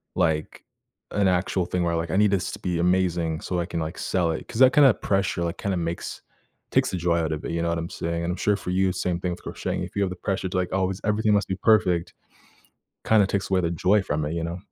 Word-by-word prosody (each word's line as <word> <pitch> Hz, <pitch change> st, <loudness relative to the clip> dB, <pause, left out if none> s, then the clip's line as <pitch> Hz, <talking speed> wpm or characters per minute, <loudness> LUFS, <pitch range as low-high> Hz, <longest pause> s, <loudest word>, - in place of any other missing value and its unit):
like, 80 Hz, -1 st, 0 dB, 0.5 s
an 100 Hz, -1 st, +2 dB
actual 90 Hz, 0 st, +1 dB
thing 90 Hz, 0 st, -1 dB
where, 85 Hz, -1 st, 0 dB
like, 80 Hz, 0 st, -3 dB
"I -, -, 0 dB
need 105 Hz, -1 st, +4 dB
this 95 Hz, -3 st, 0 dB
to -, -, -7 dB
be 90 Hz, -2 st, -2 dB
amazing 85 Hz, -3 st, +1 dB
so 90 Hz, -, -2 dB
I 85 Hz, -, -1 dB
can, 85 Hz, -, -3 dB
like, 80 Hz, +3 st, -5 dB
sell 85 Hz, -3 st, 0 dB
it." 80 Hz, -, -5 dB
'Cause 110 Hz, -, -6 dB
that 130 Hz, -1 st, +8 dB
kind 145 Hz, -2 st, +7 dB
of 110 Hz, -6 st, +2 dB
pressure, 95 Hz, -3 st, 0 dB
like, 85 Hz, 0 st, -3 dB
kinda 100 Hz, -2 st, -2 dB
makes 85 Hz, 0 st, -4 dB, 0.5 s
takes -, -, +2 dB
the -, -, -2 dB
joy 85 Hz, 0 st, +1 dB
out 80 Hz, -1 st, -1 dB
of 75 Hz, -, -5 dB
it, -, -, -3 dB
you 85 Hz, -, -1 dB
know 85 Hz, -, 0 dB
what 85 Hz, -, 0 dB
I'm 85 Hz, +1 st, -4 dB
saying? 85 Hz, 0 st, -3 dB
And 85 Hz, -, -1 dB
I'm 90 Hz, -, -4 dB
sure 105 Hz, -, +2 dB
for 95 Hz, -, -7 dB
you, 95 Hz, +1 st, +2 dB
same 90 Hz, -1 st, -1 dB
thing 90 Hz, 0 st, -2 dB
with 85 Hz, -, -7 dB
crocheting. -, -, -3 dB
If -, -, -7 dB
you 100 Hz, -, +1 dB
have 95 Hz, -, 0 dB
the -, -, -5 dB
pressure 95 Hz, +1 st, -2 dB
to, -, -, -6 dB
like, 90 Hz, -1 st, -1 dB
always 95 Hz, 0 st, -1 dB
everything 105 Hz, 0 st, +2 dB
must 105 Hz, 0 st, +2 dB
be 95 Hz, -, 0 dB
perfect, 95 Hz, -5 st, +2 dB, 0.9 s
kinda 105 Hz, -3 st, +4 dB
takes 100 Hz, 0 st, -2 dB
away 95 Hz, -1 st, +3 dB
the 85 Hz, -, 0 dB
joy 95 Hz, +5 st, +3 dB
from 75 Hz, -3 st, -1 dB
it, 75 Hz, -, -3 dB
you 85 Hz, -1 st, -2 dB
know? 85 Hz, +1 st, -4 dB
90 Hz, 275 wpm, -25 LUFS, 85-95 Hz, 0.9 s, that